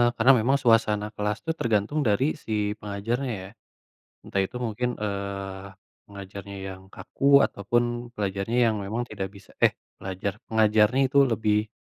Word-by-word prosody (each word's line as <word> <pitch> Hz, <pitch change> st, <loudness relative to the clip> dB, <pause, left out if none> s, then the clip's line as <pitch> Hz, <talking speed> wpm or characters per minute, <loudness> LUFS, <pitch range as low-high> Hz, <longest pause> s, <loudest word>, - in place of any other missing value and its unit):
karena 120 Hz, +4 st, +6 dB
memang 135 Hz, +5 st, +3 dB
suasana 115 Hz, -4 st, +3 dB
kelas 105 Hz, 0 st, -1 dB
tuh 160 Hz, -, +1 dB
tergantung 115 Hz, +5 st, +1 dB
dari 105 Hz, +6 st, +2 dB, 0.2 s
si 110 Hz, -, -7 dB, 0.3 s
pengajarnya 115 Hz, +6 st, -3 dB
ya. 95 Hz, -, -9 dB, 0.7 s
Entah 100 Hz, -, -2 dB
itu 125 Hz, -, -11 dB
mungkin, 120 Hz, +3 st, -2 dB
eee, 100 Hz, -1 st, -4 dB, 0.4 s
pengajarnya 100 Hz, 0 st, -9 dB, 0.2 s
yang 95 Hz, -, -15 dB
kaku 140 Hz, -, -4 dB, 0.2 s
ataupun 120 Hz, +4 st, 0 dB, 0.3 s
pelajarnya 100 Hz, +2 st, -2 dB
yang 110 Hz, -, -2 dB
memang 110 Hz, +5 st, -2 dB
tidak 95 Hz, -2 st, -4 dB
bisa 100 Hz, -, -15 dB
eh, -, -, +5 dB, 0.2 s
pelajar, 95 Hz, +1 st, -3 dB, 0.2 s
pengajarnya 110 Hz, +3 st, +4 dB
itu 140 Hz, +2 st, +1 dB
lebih 105 Hz, -1 st, +1 dB
105 Hz, 140 wpm, -26 LUFS, 100-115 Hz, 0.7 s, karena